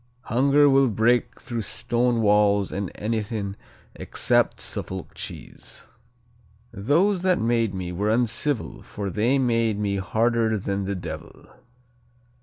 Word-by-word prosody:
"Hunger 140 +4 +3
will 135 -1 +5
break 120 +3 +1
through 120 -2 -4
stone 120 +2 0
walls 105 -1 +3
and 100 -2 -3
anything 105 -2 -3 0.4
except - - +1
a - - -3
Suffolk 95 -1 -4
cheese." - - -8 0.9
"Those 170 - +2
that 185 -1 +2
made 115 -3 +1
me 90 -1 -4
were 100 +4 -1
uncivil 120 +3 0
For 100 -2 -5
they 115 +8 +2
made 115 -4 +1
me 100 -1 -1
harder 110 +2 +1
than 100 0 -2
the 100 +1 -2
devil. 80 -4 -8
110 Hz, 125 wpm, -24 LUFS, 100-120 Hz, 0.9 s, will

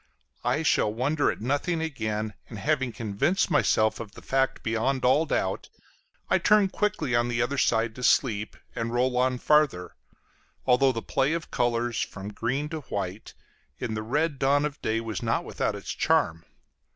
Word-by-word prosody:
I - - +1
shall 105 - +2
wonder 140 +7 +1
at - - -4
nothing 145 +7 0
again, 110 -9 -3 0.2
and 110 - -8
having 125 +5 0
convinced 115 - 0
myself 110 0 +2
of 105 -3 -8
the - - -13
fact 135 0 0
beyond 120 +4 0
all 150 +6 +4
doubt, - - -1 0.6
I - - +3
turned 210 -2 +4
quickly 210 - -1
on 120 0 +2
the 120 -1 -1
other 130 +3 0
side 115 -2 +2
to 125 - -9
sleep 110 -5 +2 0.2
and 115 0 -2
roll 125 +1 +1
on 125 0 +2
farther, 140 -11 +2 0.7
although 130 +1 +4
the 115 -3 -4
play 135 +3 +1
of 170 -1 -4
colors 120 -1 0
from 100 +1 -6
green 130 +7 -1
to 160 -1 -4
white 100 -6 -5 0.4
in - - -3
the 110 - -2
red 145 +6 -1
dawn 140 +2 +3
of 150 -1 -5
day 110 +1 0
was 115 -2 -4
not - - 0
without - - -2
its - - -6
charm. 80 0 +1
125 Hz, 175 wpm, -27 LUFS, 110-140 Hz, 0.7 s, all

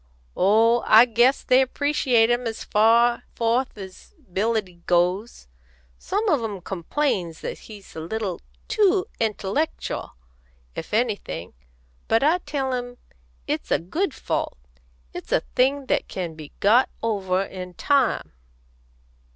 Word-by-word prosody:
"Oh, 225 +4 +4
I 225 +3 +8
guess 240 +3 +3
they 255 +1 +5
appreciate 260 -4 +2
him 240 0 0
as 225 - -5
far 235 +3 +3
forth 235 +2 0
as 190 - -11
ability 205 - -2
goes. 180 - 0 0.5
Some 420 +3 -2
on 295 - +2
'em 205 -4 -4
complains 180 - -2
that - - -5
he's 205 -3 -12
a - - -5
little 190 +2 -4 0.3
too 415 -3 +3
intellectial, 220 +7 -2 0.6
if 160 - -7
anything. 210 - -2 0.5
But 225 +3 +3
I 320 +5 +3
tell 280 -5 -3
'em 245 0 -4 0.5
it's - - -3
a - - +3
good 300 - -2
fault; - - -3 0.6
it's - - -8
a - - +3
thing 270 +2 +2
that - - 0
can 175 -3 -4
be 155 -2 -11
got 230 +6 +4
over 195 -4 0
in 180 -2 -8
time." 280 - +1
225 Hz, 130 wpm, -24 LUFS, 190-260 Hz, 0.6 s, I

